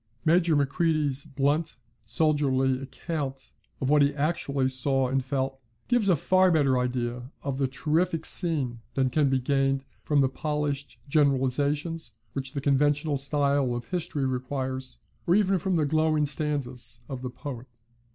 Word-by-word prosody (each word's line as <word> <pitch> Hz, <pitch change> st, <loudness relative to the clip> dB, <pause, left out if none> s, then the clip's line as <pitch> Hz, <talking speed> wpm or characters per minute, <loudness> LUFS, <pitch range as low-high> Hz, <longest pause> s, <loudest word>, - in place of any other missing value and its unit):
Major 165 Hz, 0 st, +4 dB
Macready's 145 Hz, -1 st, +1 dB
blunt 145 Hz, +1 st, 0 dB, 0.3 s
soldierly 135 Hz, -3 st, +2 dB
account 135 Hz, -1 st, -5 dB, 0.3 s
of 135 Hz, +1 st, 0 dB
what 150 Hz, -1 st, +5 dB
he 140 Hz, 0 st, +3 dB
actually 145 Hz, -3 st, 0 dB
saw 130 Hz, 0 st, +1 dB
and 130 Hz, +1 st, 0 dB
felt, 135 Hz, 0 st, -2 dB, 0.3 s
gives 235 Hz, -5 st, +3 dB
a 180 Hz, -, +5 dB
far 185 Hz, +5 st, +3 dB
better 140 Hz, -6 st, +3 dB
idea 125 Hz, 0 st, -2 dB
of 140 Hz, -1 st, -3 dB
the 135 Hz, -, +2 dB
terrific 160 Hz, +5 st, 0 dB
scene, 145 Hz, -9 st, -1 dB, 0.2 s
than 130 Hz, -1 st, +1 dB
can 145 Hz, 0 st, +3 dB
be 135 Hz, -, +2 dB
gained 135 Hz, +1 st, +1 dB, 0.2 s
from 145 Hz, -2 st, +2 dB
the 135 Hz, -, +4 dB
polished 145 Hz, 0 st, -3 dB
generalisations 145 Hz, +1 st, +1 dB, 0.2 s
which 135 Hz, 0 st, -4 dB
the 140 Hz, -, -3 dB
conventional 145 Hz, +2 st, +2 dB
style 140 Hz, -2 st, +1 dB
of 120 Hz, 0 st, -6 dB
history 160 Hz, -6 st, -2 dB
requires, 130 Hz, 0 st, -3 dB, 0.3 s
or 175 Hz, -, +5 dB
even 195 Hz, -2 st, +3 dB
from 185 Hz, +2 st, 0 dB
the 155 Hz, -3 st, +2 dB
glowing 155 Hz, 0 st, +2 dB
stanzas 140 Hz, -5 st, -2 dB
of 130 Hz, -2 st, -6 dB
the 130 Hz, -, -4 dB
poet. 130 Hz, -1 st, -7 dB
140 Hz, 150 wpm, -27 LUFS, 130-155 Hz, 0.3 s, what